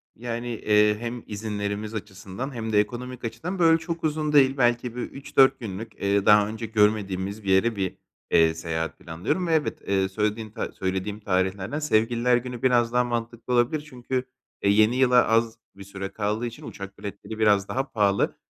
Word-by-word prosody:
Yani, 120 +1 -5
eee, 105 -2 +3
hem 120 0 -5
izinlerimiz 105 0 -4
açısından 100 +5 -6
hem 110 -2 -4
de 105 - +5
ekonomik 125 +3 -3
açıdan 140 - -4
böyle 165 -1 +6
çok 165 0 -5
uzun 155 -1 0
değil. 135 -1 +5
Belki 120 -1 +1
bir 125 - -3
3-4 135 0 +2
günlük, 110 0 -7
eee, 100 0 +1
daha 105 -1 +6
önce 110 +1 -5
görmediğimiz 105 -2 0
bir 95 - -4
yere 95 +5 +3
bir, 95 -2 -2 0.4
eee, 80 -1 +5
seyahat 80 0 -4
planlıyorum 85 - -2
ve 165 - +1
evet. 155 -2 0
Eee, 95 -1 +1
söylediğin 105 +2 -2
ta - - -4
söylediğim 95 +2 -3
tarihlerden 95 +5 -1
Sevgililer 120 -3 +2
Günü 125 -1 -6
biraz 120 -2 +3
daha 125 - +4
mantıklı 120 0 -3
olabilir 125 +5 +2
çünkü, 125 0 -3 0.4
eee, 100 - +2
yeni 110 +3 +4
yıla 125 -2 +5
az 115 0 +2 0.2
bir 100 - -10
süre 100 0 -6
kaldığı 105 +2 -2
için 120 -1 -7
uçak 100 -1 -9
biletleri 105 +2 -7
biraz 105 -2 +3
daha 135 +1 -3
pahalı. 100 -2 +1
110 Hz, 175 wpm, -25 LUFS, 100-125 Hz, 0.4 s, böyle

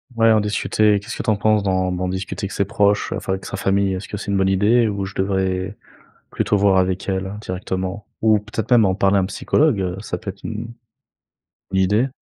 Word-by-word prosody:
Ouais, 115 0 +4
en 110 -1 +4
discuter, 105 0 +2
qu'est-ce 105 - -7
que - - -3
tu - - -1
en 105 - +3
penses 105 0 +2
d'en 95 -1 0
d'en 90 0 -2
discuter 95 +2 -4
avec 95 - -6
ses 100 - 0
proches, 105 -1 +1
enfin 95 - -2
avec 95 - -5
sa - - -5
famille, 95 0 +1
est-ce 95 +1 -5
que - - -6
c'est 105 - -6
une 100 - +1
bonne 95 0 +2
idée? 110 +5 +3
Ou 100 -2 -2
je 95 - -9
devrais 95 -1 -1 0.6
plutôt 105 - +1
voir 100 -1 +4
avec 95 0 -1
elle 95 0 -2
directement? 95 0 -4 0.2
Ou 110 -1 +4
peut-être 105 +1 -5
même 120 -2 +6
en 95 -2 +2
parler 100 +1 +2
à - - +4
un - - 0
psychologue, 100 - +1
ça 90 - -4
peut 100 - -5
être 95 - -23
une 115 +2 -5 1.0
une 95 - +1
idée? 105 +7 +2
100 Hz, 225 wpm, -21 LUFS, 95-105 Hz, 1.0 s, même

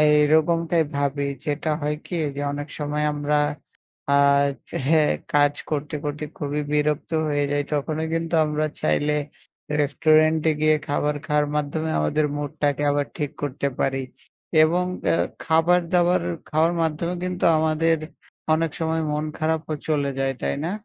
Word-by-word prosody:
এরকমটাই 160 +3 +4
ভাবি। 140 0 0 0.2
যেটা 150 +1 -1
হয় 150 +1 -1
কি 180 - -6 0.2
যে 145 - -3
অনেক 145 +1 -5
সময় 150 0 -1
আমরা 145 0 0 0.7
আ 140 - +4 0.5
যে - - -6
হ্যাঁ 155 -1 +4 0.2
কাজ 145 0 +5 0.2
করতে, 150 0 -2
করতে 145 +1 -3
খুবই 145 0 -2
বিরক্ত 150 +1 0 0.2
হয়ে 145 -1 +1
যাই। 145 0 +1
তখনো 155 +2 -1
কিন্তু 165 0 -1
আমরা 150 0 0
চাইলে 150 +1 +1 0.7
রেস্টুরেন্টে 155 +2 +3
গিয়ে 155 0 +4
খাবার 145 +1 0
খাওয়ার 150 -1 +2
মাধ্যমে 155 +2 -2
আমাদের 115 - +1
মুডটাকে 145 0 -1
আবার 145 0 0
ঠিক 145 -2 -2
করতে 140 0 -1
পারি 135 0 0 0.6
এবং 175 +3 +3 0.2
অ্যা - - +3 0.3
খাবার-দাবার 175 +2 +3 0.3
খাওয়ার 160 +2 +3
মাধ্যমে 165 +2 -1
কিন্তু 180 0 -2
আমাদের 160 +1 +2 0.6
অনেক 165 0 0
সময় 160 0 0
মন 150 +1 -1
খারাপও 160 0 -1
চলে 145 -3 +1
যায়, 135 0 0
তাই - - -1
না? 170 - -1
150 Hz, 140 wpm, -23 LUFS, 145-160 Hz, 0.7 s, কাজ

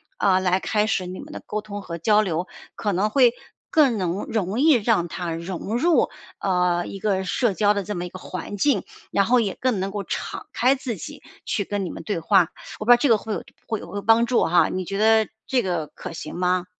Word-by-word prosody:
啊， 190 -2 +3
来 185 0 +1
开 210 -1 +1
始 190 -4 0
你 180 +1 -7
们 - - -10
的 - - -7
沟 210 - -3
通 205 -1 -7
和 170 -3 -6
交 210 +5 +4
流， 180 -3 -2 0.3
可 205 -2 -1
能 195 +4 +1
会 245 +1 +5 0.4
更 275 -8 +4
能 180 +1 -1
容 210 0 -2
易 315 +2 +6
让 215 -7 +2
他 175 0 -4
融 180 +6 -4
入， 330 +6 +3 0.3
呃， 180 -2 +1
一 195 - -7
个 195 -2 0
社 225 +3 +1
交 205 +2 +3
的 200 -1 -2
这 210 +3 -4
么 175 0 -3
一 - - -6
个 185 - -9
环 185 +2 -6
境， 280 +8 +2 0.3
然 200 - +3
后 245 +3 +4
也 200 -4 -2
更 250 -6 +1
能 195 +1 -2
够 205 0 -4
敞 - - -5
开 255 +3 +4
自 260 -4 -4
己 175 - -9 0.2
去 205 - -1
跟 205 0 -2
你 - - -4
们 - - -8
对 205 -5 -2
话。 180 +1 +4 0.3
我 215 - -4
不 - - -4
知 - - +11
道 - - +5
这 280 - +2
个 225 - +6
会 215 +1 -5
有 - - -4 0.2
会 220 -2 -2
有 - - -10
会 205 - -4
帮 225 +3 +4
助 240 0 +2
哈， 175 +1 +4
你 185 - -2
觉 195 - -4
得 220 +1 +4 0.2
这 255 -2 +1
个 175 -6 -2
可 180 +3 -9
行 155 -1 -7
吗？ 180 0 +1
200 Hz, 260 characters per minute, -23 LUFS, 180-225 Hz, 0.4 s, 知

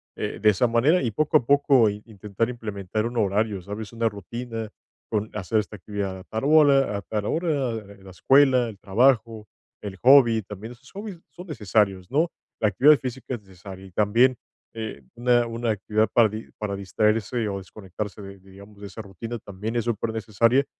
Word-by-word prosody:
eh, - - -4
de 105 - +5
esa 120 +5 +1
manera, 130 +10 +3
y 120 - 0
poco 155 +7 +2
a 125 - -2
poco 140 -4 +4
in 105 +1 -7
intentar 105 +1 -3
implementar 110 -2 -3
un 120 0 -6
horario, 105 0 +1
¿sabes?, 105 +3 -7
una 115 0 0
rutina 115 +2 -6 0.4
con 105 0 -2
hacer 105 +2 -1
esta 105 0 -2
actividad 100 -1 -4
a 95 - -12
tal 110 +4 -4
hora 140 -6 +5
a - - -5
tal 105 0 -4
hora, 150 -4 0 0.3
la 95 - -12
escuela, 130 +3 +4
el 105 - -10
trabajo, 110 +1 +1 0.3
el 100 -2 -6
hobby, 120 -4 +6
también 105 +4 -9
esos 135 +2 -19
hobbies 200 -3 -8
son 180 +1 -12
necesarios, 105 - 0
¿no? 160 +4 +2 0.3
La 110 - +4
actividad 140 +9 +5
física 130 0 -5
es 120 - -5
necesaria 95 0 -12
y - - -17
también, 115 +6 +3 0.4
eh, 110 -10 -6
una 120 0 +2
una 115 0 -2
actividad 110 +1 0
para 115 -3 +5
di 110 +2 -8
para 105 -2 -3
distraerse 105 +3 0
o 100 - -3
desconectarse 100 +1 -7
de 100 0 -10
digamos, 100 +2 -16
de 100 - -9
esa 100 +4 -8
rutina 115 +4 -7
también 105 +3 -6
es 115 -1 0
supernecesaria. 115 +3 +1
110 Hz, 180 wpm, -24 LUFS, 100-120 Hz, 0.4 s, hobby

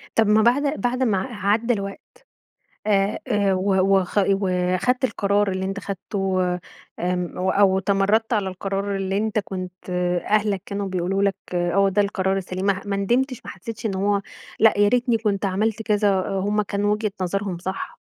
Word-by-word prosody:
طب 225 - +4
ما 210 +1 +4
بعد 280 +6 +2
بعد 250 +1 0
ما 215 -7 +2
ع 205 -2 -2
عدى 230 +3 +2
الوقت، 195 -1 -5 0.9
آآ، 200 -1 +2
آآ 200 -4 +2
و 190 +1 +1 0.3
وخ 185 +3 -2
وخدت 190 +5 +1
القرار 205 -4 +1
اللي 190 0 -2
أنت 195 +1 -3
خدته 195 -1 -2 0.6
آمم 180 0 -2
و 185 +1 +1
أو 190 -1 +4
تمردت 200 +4 +1
على 205 -4 +1
القرار 195 +1 -3
اللي 195 0 -2
أنتَ 220 0 0
كنت 185 -2 -6 0.4
أهلك 205 -3 +2
كانوا 200 0 -3
بيقولوا 185 +1 -1
لك 200 -1 +2 0.2
آه 175 +3 +2
ده 200 +2 +2
القرار 195 -1 0
السليم 185 0 -3
ماح 200 0 0
ما 200 -1 -1
ندمتش 245 +6 0
ما - - -7
حسيتش 225 +4 -6
إن 200 - -2
هو 200 +1 +1 0.4
لأ، 225 0 +5
يا 205 0 +5
ريتني 240 0 +2
كنت 210 -2 -1
عملت 210 +3 0
كذا 210 -1 +2
آآ، 195 0 0
هم 210 +2 +1
كانوا 205 +1 0
وجهة 210 -1 -2
نظرهم 185 0 -2
صح؟ 190 - -5
200 Hz, 175 wpm, -23 LUFS, 190-215 Hz, 0.9 s, لأ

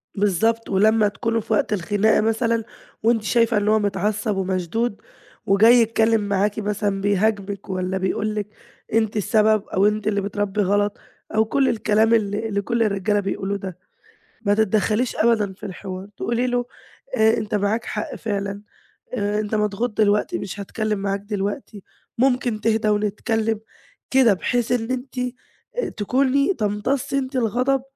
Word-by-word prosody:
بالضبط. 215 +3 +1
ولمّا 210 +2 +4
تكونوا 230 +3 -1
في 220 +1 -3
وقت 210 - +1
الخناقة 205 +4 +2
مثلًا 225 +1 +1 0.4
وأنتِ 225 -1 +2
شايفة 230 +2 +2
إن 205 0 0
هو 215 0 +4
متعصّب 210 +1 -1
ومشدود 190 +4 -1 0.4
وجاي 210 +5 +6
يتكلِّم 225 -1 +3
معاكِ 205 +1 0
مثلًا 205 -1 -1
بيهاجمِك 200 0 0
والّا 185 0 -2
بيقول 205 +3 -1
لِك 210 -1 -2 0.5
أنتِ 220 -1 +1
السبب 215 0 +3
أو 195 +2 +2
أنت 210 0 -1
اللي 200 -1 +1
بتربّي 205 +1 -1
غلط 205 +1 +1 0.4
أو 220 0 +4
كل 270 +4 +2
الكلام 220 0 +2
اللي 215 0 +1
اللي 200 0 0
كل 235 +2 0
الرجالة 205 0 +1
بيقولوه 195 0 -2
ده. 190 -3 -7 0.6
ما 205 -3 +2
تتدخّليش 220 +3 +1
أبدًا 215 -4 +2
في 205 - -11
الحوار، 190 0 -7
تقولي 240 +2 0
له 245 0 0 0.5
آآ 220 +1 +4
أنت 215 -1 -2
معاك 210 +3 0
حق 210 - -4
فعلًا، 200 -2 -3 0.5
آآ 205 -2 0
أنت 215 0 -3
مضغوط 210 +3 0
دلوقتي 210 - +2
مش 200 +1 -6
هاتكلِّم 215 +1 -2
معاك 195 0 -2
دلوقتين، 205 +1 -4 0.4
ممكن 245 -4 +1
تهدّى 220 -1 +1
ونتكلِّم؟ 215 +1 0 0.5
كده 255 -6 +5
بحيث 240 +5 -1
إن 230 -1 0
أنتِ 255 0 -4 0.6
آآ - - 0
تكوني 275 - +2
تمتصي 235 +6 -1
أنتِ 260 0 -3
الغضب 255 +3 +1
215 Hz, 150 wpm, -22 LUFS, 200-230 Hz, 0.6 s, وجاي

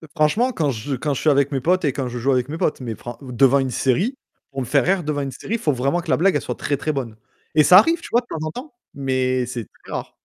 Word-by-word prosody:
Franchement 170 +12 +2
quand 155 - 0
je 130 +4 -4
quand 145 +3 -2
je 135 - -4
suis 155 - +3
avec 140 -1 +3
mes 135 -2 -1
potes 180 +4 +2
et 140 - +1
quand 130 -1 -3
je 120 0 -5
joue 135 +4 +1
avec 125 0 +1
mes 155 - -4
potes, 150 - -1
mais 115 -3 -4
fr 120 +1 -9
ou 130 -2 -9
devant 135 +3 +4
une 135 -1 -1
série 180 - 0 0.3
pour 135 - -5
me - - -3
faire 135 +3 +2
rire, 185 0 +1
devant 150 -1 -2
une 135 -1 -3
série, 210 - -4
il - - -3
faut 150 - +1
vraiment 135 +7 0
que 165 - -11
la - - +3
blague, 190 +3 +3
elle - - +1
soit - - -4
très, 145 - -2
très 155 - -2
bonne 130 -6 -4 0.4
et 155 - +6
ça 180 +5 +8
arrive, 330 - +5
tu - - -9
vois, 240 - +4
de - - -24
temps 155 -7 -4
en 155 - -3
temps, 255 - -9 0.2
mais 130 -2 0
c'est 120 -1 -5 0.2
très - - -12
rare. - - -4
140 Hz, 310 wpm, -21 LUFS, 130-165 Hz, 0.4 s, ça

